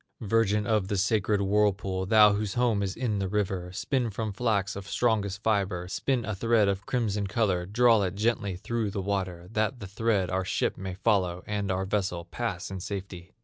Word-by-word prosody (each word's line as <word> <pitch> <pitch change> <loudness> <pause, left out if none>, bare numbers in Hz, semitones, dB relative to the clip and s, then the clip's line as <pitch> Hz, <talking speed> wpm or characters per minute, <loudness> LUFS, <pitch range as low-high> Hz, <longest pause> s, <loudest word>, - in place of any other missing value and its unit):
"Virgin 105 -1 +2
of 105 -4 +1
the 100 - -1
sacred 100 +1 +1
whirlpool, 100 -2 +1
Thou 105 0 +7
whose 100 -1 -2
home 120 -4 +2
is 95 0 -2
in 115 -4 -1
the 95 - -1
river, 95 -3 -2
Spin 120 +5 -1
from 110 0 -4
flax 100 -3 0
of 100 +1 -7
strongest 105 -4 0
fiber, 95 -5 0
Spin 125 +5 -1
a 110 - -2
thread 110 +1 +2
of 100 0 -2
crimson 105 -5 0
color, 95 -4 0
Draw 115 +1 +4
it 95 -1 -1
gently 105 -3 0
through 110 +3 -2
the 100 0 -4
water, 95 -3 -3
That 110 +3 0
the 105 - -6
thread 100 -1 0
our 95 0 0
ship 90 - -1
may 95 -1 -6
follow, 95 -4 +1
And 105 -2 -2
our 95 0 0
vessel 95 -3 -1
pass 95 0 -4
in 95 - -5
safety! 95 -2 -7
100 Hz, 190 wpm, -28 LUFS, 95-110 Hz, -, Thou